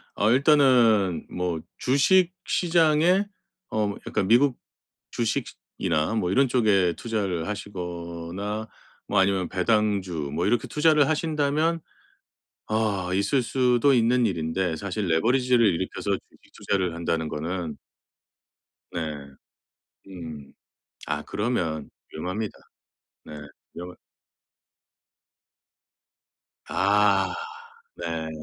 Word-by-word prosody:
어 105 - +2
일단은 125 - +4
뭐 90 -2 -2 0.2
주식 175 +7 +3
시장에 170 +2 +3 0.5
어 105 -2 0
약간 95 - -1
미국 125 +4 +4 0.5
주식이나 85 -6 -2
뭐 90 -5 0
이런 135 +6 +4
쪽에 105 -8 +3
투자를 100 -8 -2
하시거나 90 +1 -5 0.4
뭐 100 - +2
아니면 95 -2 +1
배당주 95 -6 0
뭐 85 +4 -1
이렇게 120 - +1
투자를 150 -2 +3
하신다면 155 +1 0 0.9
아 110 -4 0
있을 100 +8 +1
수도 125 +2 +3
있는 120 0 +3
일인데 85 -1 -1
사실 100 +3 -3
레버리지를 120 +7 +3
일으켜서 95 +1 -1
주식 95 - -8
투자를 95 -4 -1
한다는 80 -1 -2
거는 80 +1 -4 1.1
네. 85 - -3 1.1
음. 80 -6 -9 0.5
아 - - -2
그러면 90 -9 -2 0.2
위험합니다. 95 +7 -4 0.7
네. - - -11 0.4
위험하 90 +1 -8 2.7
아 100 0 +3 0.6
네. 80 -1 -4
100 Hz, 205 characters per minute, -25 LUFS, 90-125 Hz, 2.7 s, 일단은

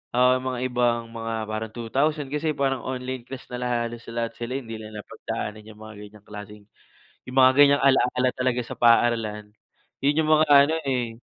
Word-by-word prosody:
oo, 125 +1 +5
mga 130 -1 -4
ibang 120 -1 +1
mga 115 0 -5 0.2
parang 110 0 -4
2000 135 +5 -1
kasi 150 0 -1
parang 135 -2 0
online 130 -1 -5
class 135 -1 -8
na 125 - -4
la 125 - -2 0.2
halos 115 0 -7
lahat 115 0 -3
sila 120 +2 -4
hindi 115 -5 -6
na 110 - -8
napagdaanan 105 +1 -6
yung 110 0 -14
mga 110 -1 -10
ganyang 105 0 -13
klaseng, 105 0 -10 0.7
yung 125 - -7
mga 130 0 +7
ganyang 140 0 +6
ala-ala 130 -1 +3
talaga 125 -1 -1
sa - - -9
paaralan, 115 -3 +2 0.5
'yun 145 +3 +2
yung 155 - -1
mga 155 0 +5 0.2
ano, 155 +3 -1
eh 120 -3 -2
120 Hz, 180 wpm, -24 LUFS, 115-130 Hz, 0.7 s, mga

